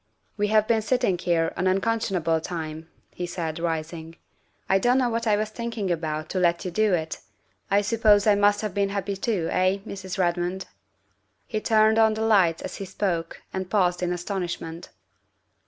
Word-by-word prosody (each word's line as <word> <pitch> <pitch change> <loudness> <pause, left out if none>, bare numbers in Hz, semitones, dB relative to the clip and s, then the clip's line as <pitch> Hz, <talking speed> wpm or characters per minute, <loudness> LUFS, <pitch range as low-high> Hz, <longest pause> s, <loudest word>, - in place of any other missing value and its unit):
' - - -47
' - - -45
" - - -44
We 210 0 +1
have 215 0 +3
been 225 -1 +2
sitting 240 -3 +1
here 165 -2 +1
an 185 - 0
unconscionable 185 -5 +1
time," 160 -1 -6 0.2
he 180 - -5
said, 165 -2 -4
rising. 165 0 -4 0.3
" - - -42
I 195 - +3
don't 245 +5 +3
know 250 -2 +2
what 230 0 -1
I 210 -1 +4
was 215 0 -2
thinking 225 -4 -3
about 155 -2 -2
to 185 - -1
let 170 -1 +1
you 180 - -3
do 215 +1 +2
it. 160 -1 -4 0.5
I 200 +1 +4
suppose 210 -1 +3
I 210 - +6
must 205 0 +3
have 210 -4 -3
been 200 0 +1
happy 200 0 -2
too, 195 -4 -1
eh, 185 +1 +2
Mrs. 190 0 -6
Redmond?" 180 +1 -1 0.8
He 215 -2 -3
turned 220 0 +4
on 220 -1 +4
the 220 - -2
lights 190 -7 +3
as - - -6
he 195 - -5
spoke 185 -3 -3
and 190 -1 -4
paused 180 -3 +1
in 180 -1 0
astonishment. 175 -2 -4
190 Hz, 195 wpm, -25 LUFS, 175-215 Hz, 0.8 s, I